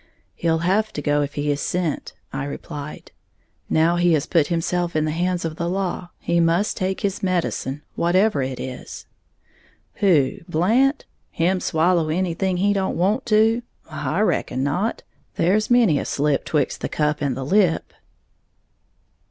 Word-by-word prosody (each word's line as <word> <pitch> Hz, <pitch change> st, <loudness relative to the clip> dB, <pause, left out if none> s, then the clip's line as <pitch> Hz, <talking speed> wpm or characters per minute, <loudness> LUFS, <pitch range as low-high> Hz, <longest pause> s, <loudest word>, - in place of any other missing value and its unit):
"He'll 165 Hz, -1 st, 0 dB
have 215 Hz, +4 st, +2 dB
to 145 Hz, -, -4 dB
go 145 Hz, +1 st, +2 dB
if 145 Hz, 0 st, -3 dB
he 145 Hz, 0 st, 0 dB
is 145 Hz, -, -2 dB
sent," 175 Hz, -4 st, -2 dB, 0.2 s
I 135 Hz, -, -3 dB
replied; 145 Hz, +1 st, -7 dB, 0.6 s
"now 165 Hz, +2 st, +3 dB
he 175 Hz, -1 st, +3 dB
has 155 Hz, -2 st, +1 dB
put 165 Hz, -5 st, +2 dB
himself 175 Hz, 0 st, -1 dB
in 155 Hz, 0 st, +2 dB
the 155 Hz, -, -1 dB
hands 175 Hz, +2 st, -1 dB
of 160 Hz, -1 st, -4 dB
the 170 Hz, 0 st, -2 dB
law, 185 Hz, -1 st, -2 dB
he 170 Hz, 0 st, 0 dB
must 170 Hz, +5 st, +2 dB
take 190 Hz, -1 st, -2 dB
his 195 Hz, -1 st, -2 dB
medicine, 170 Hz, -6 st, -1 dB
whatever 180 Hz, -1 st, +2 dB
it 130 Hz, -1 st, -3 dB
is." 130 Hz, -1 st, -7 dB, 0.9 s
"Who, 180 Hz, -2 st, +3 dB
Blant? 235 Hz, -, +2 dB, 0.2 s
Him 180 Hz, +3 st, +1 dB
swallow 165 Hz, -1 st, +1 dB
anything 180 Hz, +2 st, 0 dB
he 200 Hz, +3 st, +2 dB
don't 195 Hz, -1 st, -1 dB
want 210 Hz, +9 st, +1 dB
to? 225 Hz, +1 st, +3 dB, 0.3 s
I 160 Hz, +4 st, -1 dB
reckon 135 Hz, -10 st, 0 dB
not. 180 Hz, +11 st, -1 dB, 0.3 s
There's 210 Hz, +5 st, +2 dB
many 235 Hz, -, +4 dB
a -, -, -4 dB
slip 145 Hz, -1 st, 0 dB
'twixt 150 Hz, -4 st, -1 dB
the -, -, -2 dB
cup 150 Hz, -1 st, 0 dB
and 135 Hz, -4 st, -1 dB
the 135 Hz, -, -4 dB
lip." 185 Hz, 0 st, +2 dB
170 Hz, 160 wpm, -22 LUFS, 150-190 Hz, 0.9 s, many